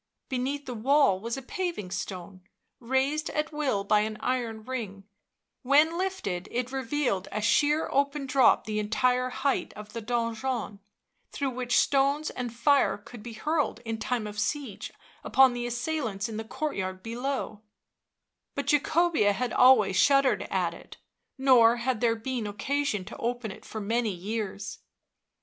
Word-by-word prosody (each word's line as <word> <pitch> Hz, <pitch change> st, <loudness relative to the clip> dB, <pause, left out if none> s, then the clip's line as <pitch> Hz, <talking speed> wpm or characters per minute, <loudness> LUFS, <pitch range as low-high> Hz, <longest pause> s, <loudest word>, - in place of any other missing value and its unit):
Beneath 270 Hz, +3 st, -2 dB
the 250 Hz, -, -5 dB
wall 245 Hz, -3 st, +3 dB
was 230 Hz, +5 st, -4 dB
a 270 Hz, -, -7 dB
paving 345 Hz, -, -4 dB
stone, 185 Hz, 0 st, -6 dB, 0.4 s
raised 265 Hz, +5 st, 0 dB
at 305 Hz, +1 st, -2 dB
will 280 Hz, -10 st, -1 dB
by 210 Hz, +1 st, +3 dB
an 215 Hz, 0 st, -2 dB
iron 235 Hz, -4 st, -2 dB
ring; 215 Hz, -6 st, -5 dB, 0.6 s
when 295 Hz, +5 st, +4 dB
lifted 345 Hz, -, -3 dB
it 250 Hz, +1 st, -2 dB
revealed 265 Hz, -6 st, -1 dB
a -, -, -2 dB
sheer 295 Hz, +8 st, +2 dB
open 280 Hz, +1 st, 0 dB
drop 260 Hz, -1 st, +4 dB
the 215 Hz, -1 st, -2 dB
entire 250 Hz, +4 st, +1 dB
height 265 Hz, +2 st, -1 dB
of 210 Hz, 0 st, -11 dB
the 230 Hz, -, -4 dB
donjon, 230 Hz, -1 st, -2 dB, 0.5 s
through 275 Hz, -2 st, -2 dB
which 250 Hz, -1 st, 0 dB
stones 280 Hz, +2 st, +2 dB
and 245 Hz, -2 st, -4 dB
fire 255 Hz, +3 st, +3 dB
could 215 Hz, +2 st, -12 dB
be 235 Hz, +1 st, -8 dB
hurled 295 Hz, +1 st, -1 dB
in 225 Hz, -1 st, -3 dB
time 235 Hz, 0 st, -1 dB
of 210 Hz, 0 st, -6 dB
siege 265 Hz, -3 st, -3 dB, 0.3 s
upon 265 Hz, -2 st, +5 dB
the 240 Hz, 0 st, -3 dB
assailants 240 Hz, -5 st, -2 dB
in 220 Hz, -2 st, -6 dB
the 220 Hz, -, -3 dB
courtyard 190 Hz, -7 st, -4 dB
below; 240 Hz, -2 st, -3 dB, 0.9 s
but 280 Hz, -, -2 dB
Jacobea 300 Hz, -6 st, +3 dB
had 250 Hz, +5 st, -2 dB
always 220 Hz, -7 st, +6 dB
shuddered 275 Hz, +2 st, +3 dB
at -, -, 0 dB
it, -, -, -13 dB, 0.4 s
nor 250 Hz, -4 st, +6 dB
had 240 Hz, -1 st, -2 dB
there 230 Hz, -2 st, +3 dB
been 230 Hz, -1 st, -3 dB
occasion 215 Hz, -1 st, -1 dB
to -, -, -9 dB
open 240 Hz, -2 st, -3 dB
it -, -, -12 dB
for 220 Hz, -, -6 dB
many 225 Hz, +2 st, 0 dB
years. 205 Hz, +2 st, -4 dB
245 Hz, 155 wpm, -28 LUFS, 215-275 Hz, 0.9 s, always